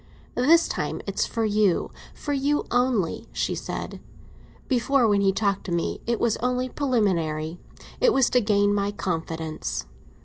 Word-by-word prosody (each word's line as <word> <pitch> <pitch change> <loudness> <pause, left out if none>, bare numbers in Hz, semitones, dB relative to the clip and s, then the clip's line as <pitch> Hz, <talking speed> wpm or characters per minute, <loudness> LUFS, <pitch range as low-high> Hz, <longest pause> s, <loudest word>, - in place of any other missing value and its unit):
"This 320 +7 +4
time - - -3
it's - - -1
for 230 -1 -1
you—for 210 - -1
you 285 +2 +1
only," 245 -8 +1
she - - -1
said. - - -5 0.7
"Before, 255 -1 +2
when 205 -2 +3
he 195 -1 +4
talked 200 0 0
to 185 - -5
me, 170 -1 -1
it 235 -1 0
was 230 -2 +1
only 250 +1 -1
preliminary—it 185 - -1
was 265 - +4
to 250 - +4
gain 205 -1 +3
my 200 0 0
confidence. 165 -5 -3
215 Hz, 140 wpm, -25 LUFS, 190-250 Hz, 0.7 s, This